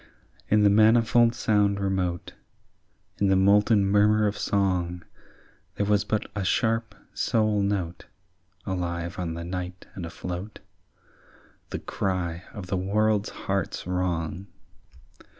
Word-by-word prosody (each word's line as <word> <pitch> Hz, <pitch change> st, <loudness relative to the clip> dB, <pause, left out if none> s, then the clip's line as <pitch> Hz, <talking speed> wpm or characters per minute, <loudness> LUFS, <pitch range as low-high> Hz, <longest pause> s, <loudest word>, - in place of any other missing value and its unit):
In 105 Hz, 0 st, +4 dB
the 100 Hz, -, +6 dB
manifold 115 Hz, +2 st, +4 dB
sound 105 Hz, -4 st, +2 dB
remote, 95 Hz, -3 st, -2 dB, 0.9 s
In 100 Hz, -, +3 dB
the 95 Hz, -, +4 dB
molten 100 Hz, +2 st, +4 dB
murmur 105 Hz, +2 st, +4 dB
of 105 Hz, 0 st, 0 dB
song, 90 Hz, -3 st, -1 dB, 0.7 s
There 100 Hz, -, 0 dB
was 105 Hz, -1 st, +2 dB
but 110 Hz, 0 st, -1 dB
a 105 Hz, -, -2 dB
sharp 115 Hz, +4 st, 0 dB, 0.2 s
sole 110 Hz, -2 st, +1 dB
note 95 Hz, -4 st, -2 dB, 0.6 s
Alive 85 Hz, -2 st, -3 dB
on 85 Hz, -2 st, -3 dB
the 85 Hz, -, -5 dB
night 90 Hz, 0 st, -5 dB
and 95 Hz, -, -7 dB
afloat, 90 Hz, +4 st, -6 dB, 1.1 s
The -, -, -3 dB
cry 90 Hz, -2 st, -3 dB
of 100 Hz, -5 st, -8 dB
the 95 Hz, +1 st, -2 dB
world's 105 Hz, +2 st, +1 dB
heart's 95 Hz, -2 st, -3 dB
wrong. 90 Hz, 0 st, -2 dB
100 Hz, 120 wpm, -26 LUFS, 90-105 Hz, 1.1 s, the